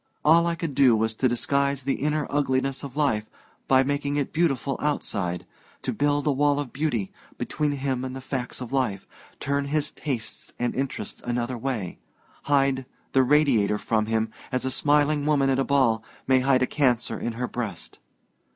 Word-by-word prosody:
All 165 +2 +6
I 170 - 0
could 165 -3 -4
do 130 -3 +5
was 110 0 +1
to 130 +4 +1
disguise 140 +3 0
the 135 +1 +1
inner 150 0 0
ugliness 135 -1 0
of 140 0 -8
life 110 -8 +1 0.4
by 130 0 +5
making 145 +1 -1
it 140 - -2
beautiful 140 -5 +1
outside 100 - -1 0.4
to - - -1
build 145 0 +1
a 150 - +3
wall 145 +1 +2
of 145 -4 -5
beauty 130 -9 -1 0.3
between 150 -1 -1
him 135 -2 -2
and 130 0 -4
the - - -5
facts 130 -1 -4
of 125 +1 -6
life, 120 -8 0 0.3
turn 140 0 -1
his 150 +1 -1
tastes 120 -7 -5
and 120 - -1
interests 135 0 -4
another 120 +1 -2
way, 115 -7 -3 0.5
hide 135 -2 +2 0.2
the 135 - +4
Radiator 130 -7 +3
from 110 0 0
him 110 0 0 0.2
as 130 0 -1
a 130 - 0
smiling 145 +1 +2
woman 140 -3 +3
at 135 - +1
a - - +3
ball 130 -6 +2 0.2
may 130 -1 +4
hide 130 0 +3
a - - +4
cancer 125 -4 +1
in 120 - -3
her 125 +2 -3
breast! 110 -10 -6
135 Hz, 180 wpm, -25 LUFS, 120-145 Hz, 0.5 s, All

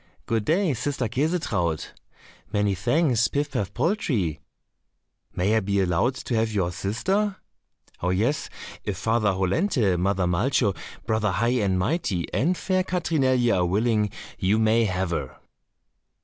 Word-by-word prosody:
"Good 115 -2 -1
day, 170 -1 +2
sister 130 0 -2
Käsetraut." 115 - -1 0.6
"Many 105 -1 +1
thanks, 120 - +2
Pif 145 0 -2
paf 105 -8 -2
poltrie." 120 - 0 1.0
"May 100 +5 +2
I - - +4
be 100 -1 0
allowed 95 +8 +1
to 130 - -5
have 110 0 +1
your 95 -4 0
sister?" 190 - -1 0.7
"Oh, 90 - 0
yes, 110 +11 0 0.3
if 100 - -3
Father 110 0 +1
Hollenthe, 95 - +1
Mother 95 0 +1
Malcho, 100 +4 +1 0.3
Brother 110 -1 +1
High 120 +5 +1
and 95 -2 +1
Mighty, 95 - 0
and 175 +6 +1
fair 185 -1 0
Katrinelje 135 - +1
are 90 - +2
willing, 105 +2 +1 0.3
you 100 +3 +2
may 110 +1 +3
have 95 -2 -1
her." 70 -6 -3
110 Hz, 135 wpm, -25 LUFS, 95-135 Hz, 1.0 s, I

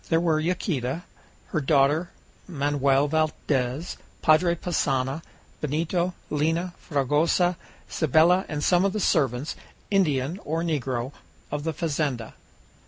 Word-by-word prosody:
There 165 - +3
were 165 -2 +2
Yaquita, 160 -3 -1 0.5
her 155 - -1
daughter, 145 +4 +3 0.4
Manoel 140 -3 +2
Valdez, 150 -2 -1 0.3
Padre 170 +3 +4
Passanha, 140 -4 -1 0.4
Benito, 170 +4 -1 0.2
Lina, 165 +4 0
Fragoso, 155 +5 +1 0.3
Cybele, 165 +4 +3
and 150 -1 -3
some 180 0 +4
of 195 -1 +1
the 215 - -1
servants, 140 - +1 0.4
Indian 160 -4 +1
or 165 +2 -2
negro, 135 -6 -2 0.4
of 145 +1 -3
the 160 - 0
fazenda. 145 -7 -2
155 Hz, 110 wpm, -25 LUFS, 140-170 Hz, 0.5 s, Padre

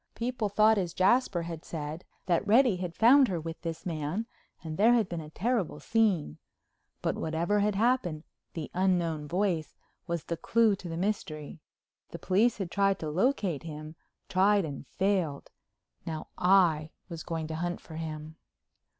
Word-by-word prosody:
People 240 -2 -2
thought 215 +1 +4
as 175 -3 -3
Jasper 190 -2 +3
had 165 -1 -6
said, 155 +1 -6 0.2
that 180 +3 +1
Reddy 230 -2 +5
had 180 -2 -5
found 260 +4 +6
her 180 -5 -2
with 165 0 -7
this 165 -1 -5
man 165 +5 -2 0.4
and 160 -1 -5
there 225 +6 +5
had 225 -5 +2
been 170 -2 -4
a 150 - -10
terrible 215 +3 -1
scene. 195 - +1 0.6
But - - +1
whatever 170 +6 0
had 205 0 +1
happened 205 -8 +1 0.3
the 160 -3 -5
Unknown 175 -5 +1
Voice 175 -3 -1 0.3
was 170 -2 -2
the 170 - -4
clew 225 +3 +3
to 180 - -8
the 165 - -4
mystery. 165 -6 -3 0.5
The - - -7
police 200 +8 +2
had 190 -4 -4
tried 195 -1 +2
to 155 -4 -4
locate 190 - +1
him, 155 0 -8 0.3
tried 195 0 +3
and 145 -2 -7
failed. 185 -7 -1 0.5
Now 160 -1 -5
I 175 -5 +3 0.2
was 170 -3 -7
going 165 -1 -4
to 160 - -3
hunt 175 +1 -2
for 160 - -10
him. 155 0 -6
175 Hz, 165 wpm, -29 LUFS, 160-205 Hz, 0.6 s, found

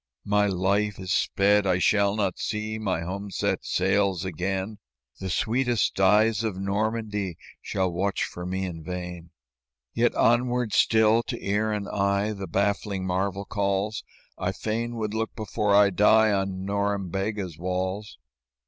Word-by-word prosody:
"My 105 0 +3
life 100 +2 0
is 95 -1 -5
sped; 100 +3 +3
I 90 -1 +3
shall 100 +2 +3
not 100 -4 -1
see 110 0 -3
My 95 -6 -1
home 100 +4 -5
set - - -1
sails 95 -1 +1
again; 95 +4 -3 0.4
The 95 - -4
sweetest 120 +1 0
eyes 105 +3 +4
of 105 -4 -2
Normandie 105 -2 -2 0.2
Shall 95 -2 -1
watch 95 +3 -1
for 90 - -6
me 95 +1 -2
in 80 -3 -6
vain. 90 -1 -6 0.6
"Yet - - +2
onward 120 -1 +2
still 110 +1 +4
to - - -3
ear 105 +2 0
and 105 -1 -2
eye 100 +1 0
The 100 -2 -6
baffling 100 +1 -1
marvel 95 +2 -1
calls; 100 +1 -1 0.4
I 90 +1 -1
fain 115 +3 -3
would 110 -2 -3
look 110 0 -2
before 105 -1 0
I 100 0 +6
die 110 +3 +5
On 95 -1 -1
Norembega's 100 -2 -2
walls. 95 +1 -3
100 Hz, 145 wpm, -26 LUFS, 95-105 Hz, 0.6 s, I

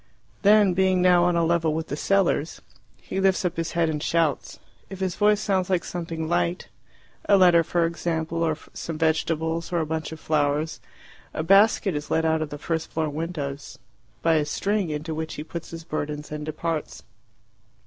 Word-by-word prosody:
Then 205 -2 +5
being 185 0 +2
now 180 -1 +5
on 175 -1 +2
a 170 -1 +2
level 165 -2 +1
with 160 0 -4
the 145 - -2
cellars 175 -2 +1 0.4
he 190 - -5
lifts 190 -1 +2
up 180 - -1
his 165 0 -3
head 170 -1 +2
and 155 -2 -2
shouts. 165 -3 0 0.3
If 195 - -8
his 185 -2 -1
voice 210 0 +3
sounds 190 -3 0
like 180 -3 +1
something 165 -2 -4
light 175 +1 -1 0.6
a 200 - +7
letter, 175 -3 +6
for 170 +1 +1
example, 165 -1 -2
or 160 -2 +1 0.2
some 165 -2 -5
vegetables, 160 +1 0
or 175 - +1
a 160 - 0
bunch 160 0 -3
of 160 - -8
flowers 150 +1 0 0.6
a 155 - -1
basket 195 +2 +4
is 145 0 -4
let 160 0 +1
out 160 0 +2
of 155 - -3
the 145 - -6
first 160 +2 -3
floor 160 -1 -1
windows 145 -3 -5 0.5
by 165 -1 +4
a 150 - +1
string, 200 +4 -1
into 155 +2 -4
which 160 0 -4
he 150 - -5
puts 170 +1 -7
his 165 0 -8
burdens 150 -2 -4
and 150 0 -5
departs. 160 0 -4
165 Hz, 190 wpm, -25 LUFS, 155-180 Hz, 0.6 s, a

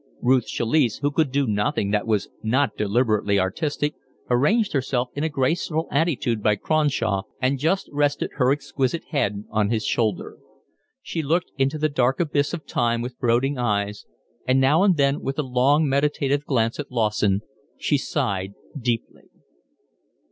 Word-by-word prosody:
Ruth 130 -1 +3
Chalice, 120 0 +1
who 145 +1 -1
could 150 -2 +1
do 140 +1 +1
nothing 105 -2 0
that 105 +1 0
was 105 -3 +1
not 130 +6 +1
deliberately 105 -1 +1
artistic, 145 - -1 0.4
arranged 190 - +2
herself 130 -2 -1
in 145 - -3
a 160 - +1
graceful 155 +3 -1
attitude 140 -7 0
by 105 0 +3
Cronshaw 125 -7 0 0.2
and 130 +1 0
just 165 +7 0
rested 145 0 0
her 130 -2 +3
exquisite 140 +1 -1
head 105 -9 -1
on 105 -1 +1
his 110 -1 -1
shoulder. 110 -5 -1 0.6
She 165 - -3
looked 165 +5 0
into 135 +2 0
the 155 0 +1
dark 130 -3 +1
abyss 145 -4 +1
of 160 -4 -6
time 120 -1 0
with 125 0 -7
brooding 125 +3 +1
eyes, 105 -3 -1 0.4
and 130 +1 +4
now 140 +6 +4
and 190 -4 +4
then 140 0 +2
with 135 0 -3
a 150 - 0
long 135 +4 +2
meditative 140 0 +1
glance 115 -3 0
at 145 - -5
Lawson 105 -4 +1 0.4
she - - +1
sighed 95 0 -2 0.2
deeply. 120 -4 -3
130 Hz, 155 wpm, -23 LUFS, 115-145 Hz, 0.6 s, and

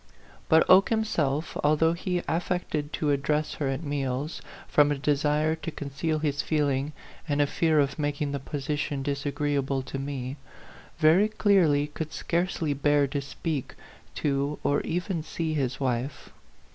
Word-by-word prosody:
But 160 0 +5
Oke 190 +2 +7
himself, 160 -10 0
although 155 +2 +4
he 180 +1 -2
affected 165 -3 -1
to 150 -2 0
address 150 +2 0
her 145 - -2
at 135 +4 -2
meals, 140 0 -2 0.3
from 145 0 +4
a 145 - 0
de 145 +1 +2
sire 150 +2 +1
to 165 - -5
conceal 150 +1 -2
his 145 -2 0
feeling 145 -2 0 0.4
and 145 0 +1
a 145 - +5
fear 155 +1 +2
of 140 +1 0
making 145 -1 -1
the 140 - -2
position 145 0 -3
disagreeable 140 -1 -1
to 135 +1 -5
me, 135 -1 -4 0.6
very 165 +6 +5
clearly 185 -9 +3
could 155 +1 -6
scarcely 170 -3 -1
bear 145 +1 +3
to 140 +1 -2
speak 140 0 -4 0.4
to 140 0 0
or 145 - +2
even 175 0 -2
see 160 0 -3
his 130 -4 -1
wife. 130 +1 -2
145 Hz, 150 wpm, -27 LUFS, 140-160 Hz, 0.6 s, Oke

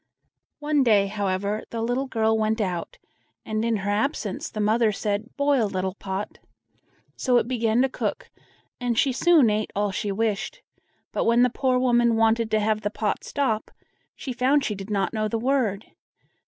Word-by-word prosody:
One 295 -1 +1
day, 215 -6 +4
however, 200 +1 -2
the 230 - -5
little 245 +4 -1
girl 220 -3 +1
went 220 +1 0
out, 190 - -3 0.5
and 215 0 -2
in 230 -1 +1
her 205 0 -2
absence 215 -1 -2
the 215 - -7
mother 215 +1 +3
said: 210 +2 -2
"Boil, 280 -5 +2
little 185 -1 -2
pot!" 195 +1 -5 0.8
So 250 -2 +2
it 235 - +1
began 235 -1 +1
to - - +3
cook, - - -4 0.5
and 245 -2 -1
she 270 +2 +3
soon 285 -3 +4
ate 210 0 -1
all 205 0 0
she 205 +2 -2
wished; 220 - -2 0.5
but - - -1
when 235 +1 +4
the 250 - +3
poor 255 0 +1
woman 240 -2 +3
wanted 225 0 +2
to 215 0 +2
have 215 0 0
the 205 - -1
pot 210 -1 -2
stop, 230 -7 -1 0.5
she 260 - -5
found 265 +3 +2
she 210 - -1
did 195 0 -8
not 200 +1 0
know 215 -1 0
the 225 - -2
word. 230 -5 0
220 Hz, 180 wpm, -25 LUFS, 210-250 Hz, 0.8 s, day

